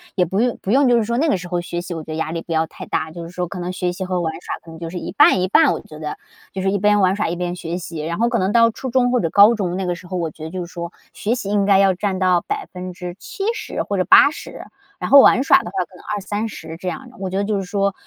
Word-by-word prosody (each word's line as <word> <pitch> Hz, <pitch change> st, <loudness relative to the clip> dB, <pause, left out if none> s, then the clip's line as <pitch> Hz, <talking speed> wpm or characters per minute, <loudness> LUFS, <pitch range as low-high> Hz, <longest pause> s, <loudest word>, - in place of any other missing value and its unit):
也 180 Hz, -, +3 dB
不 190 Hz, +4 st, -2 dB
用 245 Hz, 0 st, 0 dB
不 195 Hz, -, -3 dB
用 270 Hz, +1 st, +4 dB
就 240 Hz, -, +5 dB
是 230 Hz, -, +2 dB
说 235 Hz, +2 st, -1 dB
那 320 Hz, -, +2 dB
个 195 Hz, -, +2 dB
时 180 Hz, 0 st, -8 dB
候 175 Hz, 0 st, -1 dB
学 175 Hz, 0 st, -4 dB
习， 175 Hz, 0 st, -6 dB
我 165 Hz, -, -5 dB
觉 155 Hz, -, -9 dB
得 -, -, -3 dB
压 160 Hz, 0 st, -2 dB
力 165 Hz, 0 st, -3 dB
不 170 Hz, -, -10 dB
要 160 Hz, 0 st, +2 dB
太 -, -, -11 dB
大， 160 Hz, -, -2 dB
就 170 Hz, +1 st, -8 dB
是 165 Hz, -, -8 dB
说 180 Hz, 0 st, -3 dB
可 180 Hz, +2 st, -7 dB
能 180 Hz, +1 st, -3 dB
学 180 Hz, -1 st, -2 dB
习 185 Hz, +1 st, -5 dB
和 185 Hz, -1 st, -1 dB
玩 160 Hz, -1 st, -2 dB
耍 -, -, -4 dB
可 165 Hz, -, -11 dB
能 160 Hz, -, -11 dB
就 165 Hz, -1 st, -5 dB
是 180 Hz, -, -6 dB
一 -, -, -5 dB
半 -, -, +5 dB
一 185 Hz, -, +1 dB
半， 290 Hz, +10 st, +5 dB
我 -, -, -2 dB
觉 155 Hz, -1 st, -12 dB
得， 150 Hz, -1 st, -5 dB, 0.3 s
就 190 Hz, -, -4 dB
是 195 Hz, -, +1 dB
一 200 Hz, -, 0 dB
边 210 Hz, +1 st, +3 dB
玩 190 Hz, -1 st, +3 dB
耍 210 Hz, -, -1 dB
一 170 Hz, -, -2 dB
边 175 Hz, 0 st, -3 dB
学 170 Hz, -1 st, -4 dB
习。 170 Hz, -2 st, -7 dB
然 170 Hz, +2 st, -3 dB
后 235 Hz, -, +2 dB
可 235 Hz, -1 st, 0 dB
能 185 Hz, +2 st, +1 dB
到 230 Hz, +1 st, +5 dB
初 260 Hz, +3 st, -6 dB
中 245 Hz, 0 st, +2 dB
或 250 Hz, -, +2 dB
者 165 Hz, -, 0 dB
高 205 Hz, +6 st, +7 dB
中 185 Hz, -5 st, -2 dB
那 190 Hz, -, -2 dB
个 180 Hz, -, 0 dB
时 175 Hz, +1 st, -11 dB
候， 185 Hz, 0 st, -4 dB
我 165 Hz, -3 st, -2 dB
觉 155 Hz, -, -12 dB
得 -, -, -5 dB
就 180 Hz, +1 st, -5 dB
是 170 Hz, -, -15 dB
说 170 Hz, -1 st, -5 dB, 0.2 s
学 225 Hz, +4 st, -1 dB
习 220 Hz, -, -5 dB
应 205 Hz, -1 st, +2 dB
该 200 Hz, -1 st, +5 dB
要 195 Hz, -1 st, +4 dB
占 190 Hz, +1 st, -2 dB
到 185 Hz, -2 st, +3 dB
70% 200 Hz, -, -5 dB
或 200 Hz, -, -3 dB
者 185 Hz, -, +2 dB
80， 295 Hz, -, +4 dB, 0.3 s
然 -, -, -4 dB
后 280 Hz, -, +10 dB
玩 260 Hz, -, +5 dB
耍 -, -, +6 dB
的 -, -, -9 dB
话， 185 Hz, -1 st, -2 dB
可 185 Hz, -, -20 dB
能 -, -, -15 dB
20-30 205 Hz, -5 st, -5 dB
这 185 Hz, -, -7 dB
样 245 Hz, +7 st, -5 dB
的， -, -, -18 dB
我 190 Hz, -1 st, -3 dB
觉 190 Hz, -, -3 dB
得 200 Hz, -, +1 dB
就 205 Hz, 0 st, -1 dB
是 195 Hz, -, -2 dB
说， 200 Hz, +1 st, 0 dB
185 Hz, 335 characters per minute, -20 LUFS, 175-210 Hz, 0.3 s, 后